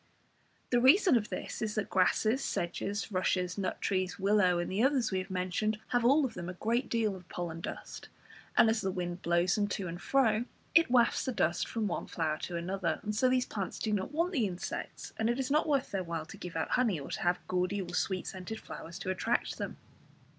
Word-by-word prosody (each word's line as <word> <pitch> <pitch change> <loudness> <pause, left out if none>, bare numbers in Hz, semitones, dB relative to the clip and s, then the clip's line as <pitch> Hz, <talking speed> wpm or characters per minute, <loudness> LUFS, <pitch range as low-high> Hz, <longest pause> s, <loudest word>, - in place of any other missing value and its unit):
The 245 -1 +4
reason 315 - +6
of 215 -3 +1
this - - -5
is 215 -2 -2
that 215 -3 -2
grasses, 215 +6 +2
sedges, 200 +5 -2
rushes, 180 -1 0
nut 190 -2 -2
trees, 185 -1 0
willow, 195 -2 +3
and 175 +1 -2
the 195 +3 +1
others 265 -3 +3
we 190 - +1
have 185 +1 -6
mentioned, 185 +4 -1
have 245 -1 +2
all 275 +5 +5
of 255 - -4
them 175 0 -5
a - - -4
great 235 +6 0
deal 220 -4 +1
of 180 -1 -13
pollen 165 -2 -4
dust, - - -7 0.5
and - - +7
as 220 0 +2
the 190 - 0
wind 180 -1 -3
blows 170 +2 +2
them 205 -2 +1
to 200 -2 -3
and 170 +1 -6
fro, 235 -3 +2 0.3
it 330 -4 +6
wafts 240 -1 +4
the 260 - 0
dust - - +1
from 225 -2 -2
one 190 - -2
flower 155 -2 -1
to 175 - -4
another, 180 +1 -1
and 210 0 -2
so 255 +4 +3
these 255 0 +2
plants 195 -4 -4
do 215 - -1
not 195 +4 -1
want 335 +4 +1
the 250 - +1
insects, 180 -1 -6
and 220 +1 +1
it 240 - +1
is 265 +1 -1
not 305 +2 +3
worth 275 -3 +1
their 195 -2 -1
while 165 -2 -4
to - - -10
give 180 -2 -7
out 160 - -1
honey, 230 -10 +2
or 140 - -8
to - - -3
have 175 +1 +2
gaudy 185 +2 0
or 175 -2 -5
sweet 185 0 0
scented 190 +4 -6
flowers 170 +1 -8
to 185 0 -2
attract 225 +5 -1
them. - - -4
200 Hz, 225 wpm, -31 LUFS, 180-235 Hz, 0.5 s, and